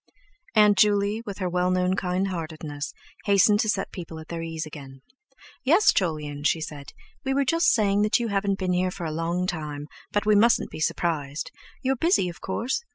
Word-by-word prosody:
Aunt 210 -2 +5
Juley, 205 +1 +3
with 200 - -5
her 185 - -2
well 180 0 +1
known 185 0 +1
kindheartedness, 165 -6 -3 0.3
hastened 200 +1 +5
to 215 -1 +1
set 195 -2 -1
people 165 -3 -8
at 160 0 -10
their 170 -1 -4
ease 165 -1 -4
again. 135 -3 -11 0.6
"Yes, 335 +10 +5
Jolyon," 150 -5 -2
she 160 - +2
said, 150 -3 -7 0.3
"we 270 0 0
were 280 0 +2
just 330 +5 +3
saying 205 -3 +2
that 210 0 +3
you 235 -1 -2
haven't 200 -1 0
been 185 -2 -1
here 180 +1 +1
for 180 -1 -6
a 160 - -2
long 170 +3 -1
time; 150 -5 -4 0.3
but 205 +1 0
we 215 - +4
mustn't 220 +3 +4
be - - -7
surprised. 155 -2 -2 0.3
You're 265 +1 +2
busy, 330 - +2
of 175 - -11
course? 240 - -2
185 Hz, 190 wpm, -25 LUFS, 160-210 Hz, 0.6 s, Aunt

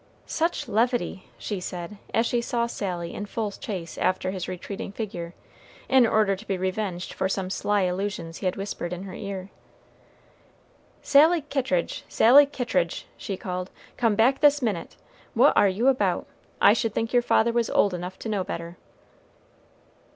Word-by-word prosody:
"Such 330 +2 -1
levity!" 235 -3 0
she 205 -3 -4
said, 180 +2 -6
as 225 - +2
she 240 0 +1
saw 235 -1 0
Sally 180 -7 -4
in 205 - -5
full 215 -1 -3
chase 185 -5 -6
after 185 0 0
his 185 -2 -4
retreating 195 +2 -6
figure, 180 -5 -6 0.5
in 260 -3 +5
order 215 -3 +3
to 215 +4 -13
be 195 - -1
revenged 185 -1 -3
for 190 - -1
some 190 -1 -2
sly 205 +1 +1
allusions 180 -2 -2
he 190 - -1
had 185 - 0
whispered 195 -3 -4
in 180 +1 -6
her 190 -2 -8
ear. 195 -1 -6 1.5
"Sally 315 +4 +5
Kittridge! 260 - -1
Sally 275 +5 +7
Kittridge!" 210 - -1
she 195 - -5
called, 180 0 -4 0.3
"come 230 -4 +2
back 250 +5 +3
this 295 0 +5
minute. 215 -10 -3 0.4
What 255 +6 +5
are 200 - +5
you 215 +7 0
about? 270 0 +2 0.3
I 205 - +7
should 225 -1 -1
think 225 +1 -1
your 245 - +5
father 235 -1 +3
was 235 -2 +1
old 200 - +3
enough 180 +1 -5
to 225 - -4
know 205 -3 0
better." 170 0 -6
200 Hz, 165 wpm, -25 LUFS, 185-235 Hz, 1.5 s, Sally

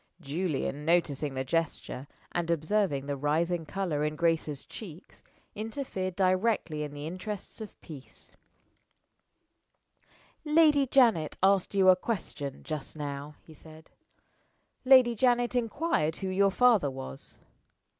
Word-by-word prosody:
Julian, 150 -2 -3
noticing 150 -4 +1
the 130 - -1
gesture, 140 -2 -3 0.2
and 170 -1 -2
observing 165 -3 0
the 145 0 -2
rising 160 +4 0
color 175 -6 -2
in 150 0 -1
Grace's 160 -4 0
cheeks, 180 -6 -11 0.3
interfered 215 -5 -4
directly 185 -4 +1
in 150 -1 -4
the 145 +1 -6
interests 185 +6 -6
of 215 - -9
peace 145 -6 -12 2.1
"Lady 300 -3 +4
Janet 230 - +3
asked 195 0 +3
you 190 -1 +5
a 185 - +8
question 180 - -5
just 155 -2 -6
now," 145 0 -5
he 160 - -15
said; 155 +1 -15 0.9
"Lady 255 -2 +7
Janet 245 +1 +2
inquired 230 - 0
who 190 - -4
your 195 +1 +3
father 220 - +4
was." 135 +1 -7
170 Hz, 120 wpm, -29 LUFS, 150-210 Hz, 2.1 s, a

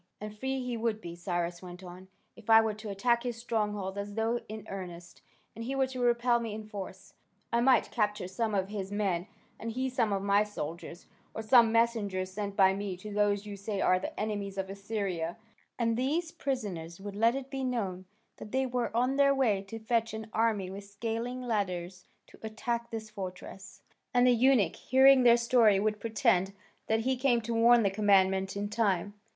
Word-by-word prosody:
"And 210 0 -7
free 265 +3 -3
he 250 -1 -3
would 225 -1 -1
be," 170 -5 -8
Cyrus 175 -1 -3
went 180 0 -10
on, 180 +1 -11 0.3
"if 230 -1 -14
I 225 0 +9
were 220 -1 +1
to 215 0 -8
attack 235 +4 +1
his 240 -2 -4
strongholds 210 -4 -2
as 200 0 -6
though 225 +2 0
in 215 -1 -7
earnest, 175 -3 -8 0.3
and 230 - -6
he 265 +4 -3
were 270 -1 +3
to 260 -1 -7
repel 240 0 +3
me 225 -3 -4
in 215 0 -7
force. 200 -3 -8 0.4
I 235 - +3
might 255 +1 +4
capture 210 -5 -1
some 215 +3 -2
of 190 0 0
his 200 -2 -5
men, 195 -3 -1 0.3
and 230 - -4
he 260 +2 -1
some 235 -4 0
of 195 -1 -1
my 200 +1 +4
soldiers, 170 -4 -7 0.3
or 220 - -4
some 230 0 +6
messengers 210 -5 +1
sent 200 0 -4
by 190 -2 +5
me 195 -2 -4
to 210 +3 -8
those 205 0 +1
you 205 -1 -6
say 200 0 -4
are 185 -1 +3
the - - -6
enemies 205 -2 -3
of 190 0 -3
Assyria, 195 -5 -3 0.4
and 230 -1 +1
these 310 +7 -1
prisoners 195 - -4
would 200 0 -7
let 230 +4 +3
it 270 0 -6
be 270 -1 -3
known 200 -8 -2 0.3
that 210 - -10
they 265 +1 +1
were 245 -2 -1
on 255 +3 +1
their 275 0 +5
way 225 -8 +2
to 225 - -6
fetch 225 0 -1
an 220 0 -8
army 215 -5 +1
with 200 +1 -7
scaling 230 +5 -4
ladders 185 -5 -3 0.2
to - - -18
attack 235 +2 -3
this 220 -1 -6
fortress, 190 -1 -8 0.3
and 245 0 +5
the 250 - +6
eunuch, 240 -7 +3
hearing 265 0 +6
their 240 -1 +6
story, 235 -4 +4
would 210 +1 0
pretend 200 -3 +1 0.3
that 220 0 +1
he 260 +3 +1
came 250 -2 +2
to 230 +1 -4
warn 235 +1 +5
the 200 - +2
commandant 195 -1 +2
in 205 0 -2
time." 205 -3 0
215 Hz, 200 wpm, -30 LUFS, 195-235 Hz, 0.4 s, I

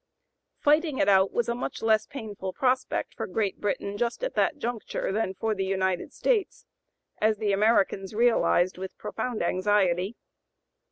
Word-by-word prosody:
Fighting 300 -1 +2
it - - +2
out 195 -1 +5
was 240 -1 0
a 235 - 0
much 240 - -5
less 220 -1 +3
painful 210 -8 -6
prospect 260 0 0
for - - -5
Great 205 -4 -2
Britain 200 0 -2
just 240 - -1
at - - -1
that 295 - +1
juncture 240 -7 -3
than 195 -2 -1
for 220 +3 -1
the 195 -2 -2
United 190 -1 -1
States, 445 -6 -1 0.5
as 215 0 +2
the 210 -1 0
Americans 200 -1 +2
realized 215 -6 +3
with 190 0 -7
profound 225 -2 -3
anxiety. 185 +1 +1
215 Hz, 155 wpm, -27 LUFS, 190-240 Hz, 0.5 s, out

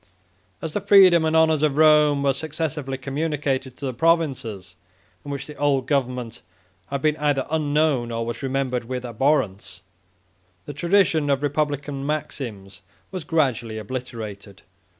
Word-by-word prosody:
As 160 -2 -4
the 205 - -1
freedom 185 -4 +6
and 160 0 +1
honors 160 -2 +4
of 150 -2 +1
Rome 150 -2 +5
were 140 -1 +3
successively 150 -2 -3
communicated 135 -2 -2
to 140 - -6
the 130 - -2
provinces, 120 - 0 0.5
in 145 - -9
which 140 -1 -4
the 150 - -10
old 140 -3 +1
government 125 -5 -2 0.5
had 140 0 -4
been 155 -1 +3
either 145 -3 0
unknown, 150 -5 +1
or 115 0 -2
was 120 - -5
remembered 130 -3 -1
with 125 +1 -4
abhorrence, 110 -7 -1 0.8
the 145 - -7
tradition 170 -1 +2
of 140 0 +1
republican 145 -1 -2
maxims 115 -10 -5 0.3
was 185 -3 -5
gradually 130 -8 0
obliterated. 110 -3 -7
140 Hz, 140 wpm, -23 LUFS, 125-155 Hz, 0.8 s, freedom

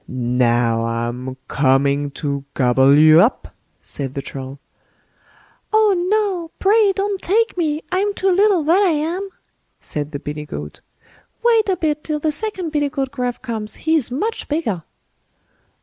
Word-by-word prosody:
"Now, 120 -2 +1
I'm 120 +3 -4
coming 140 +1 +1 0.2
to 140 -1 -2
gobble 130 +2 +4
you 155 +2 +7
up", 225 +7 0 0.3
said 135 -2 -6
the 140 - -2
Troll. 135 0 -8 1.1
"Oh, 435 -1 +4 0.2
no! 395 -6 0
pray 415 +1 +4
don't 395 -1 -2
take 450 +4 +1
me. 315 -3 -1
I'm 390 +3 +1
too 385 0 +1
little, 385 -2 +3
that 340 +6 +3
I 395 - +4
am", 335 +5 -2 0.5
said 150 0 -5
the 145 - -4
billy 150 +1 -6
goat; 75 - -8 0.6
"wait 455 -3 +3
a 375 - +1
bit 300 -2 -1
till 305 -1 -2
the 305 +1 -1
second 370 0 -3
billy 290 -2 0
goat 270 -1 -3
Gruff 250 -3 -4
comes, 220 -4 -4
he's 315 -5 +3
much 415 - -3
bigger." 260 - -2
280 Hz, 150 wpm, -19 LUFS, -, 1.1 s, you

